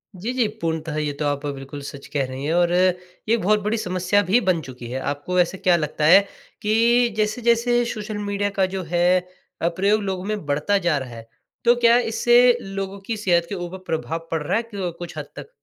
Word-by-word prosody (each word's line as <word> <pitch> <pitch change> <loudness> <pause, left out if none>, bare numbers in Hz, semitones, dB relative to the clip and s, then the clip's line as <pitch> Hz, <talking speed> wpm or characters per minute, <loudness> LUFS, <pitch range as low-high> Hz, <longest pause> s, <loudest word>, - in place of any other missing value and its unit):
जी, 210 +7 -4
जी, 250 -3 +2
पूर्णतः 160 -2 -2
ये 150 -1 -1
तो 150 +1 -4
आप 145 0 -2
बिल्कुल 140 0 -6
सच 140 - -9
कह 140 -2 +1
रही 130 +2 -6
हैं 160 - 0
और 175 0 +3
ये 180 +4 0
बहुत 210 0 +2
बड़ी 215 +2 0
समस्या 185 0 +1
भी 230 +6 +5
बन 185 -5 +1
चुकी 125 -4 -9
है। 130 - -2
आपको 145 +6 -3
वैसे 180 +1 +2
क्या 180 -1 +3
लगता 150 -1 -2
है 170 +5 +8 0.4
कि 235 +3 +3
जैसे-जैसे 235 +2 +2
सोशल 215 -1 -5
मीडिया 205 0 -1
का, 195 -1 +1
जो 190 0 -4
है 175 +2 +2 0.4
अ, 170 - +2
प्रयोग 200 +5 +1
लोगों 190 -2 -3
में 210 -4 -4
बढ़ता 150 +8 +1
जा 155 -4 +3
रहा 130 -2 -5
है, 115 0 -11 0.4
तो 240 - +6
क्या 235 0 +5
इससे 240 +1 +4
लोगों 195 0 -5
की 225 0 -3
सेहत 175 -4 +2
के 200 - -3
ऊपर 175 0 -6
प्रभाव 165 +1 -3
पड़ 160 - -1
रहा 175 +7 0
है 230 - -1
क 180 -4 -3
कुछ 170 -2 -8
हद 150 - -4
तक? - - -9
185 Hz, 215 wpm, -22 LUFS, 160-210 Hz, 0.4 s, है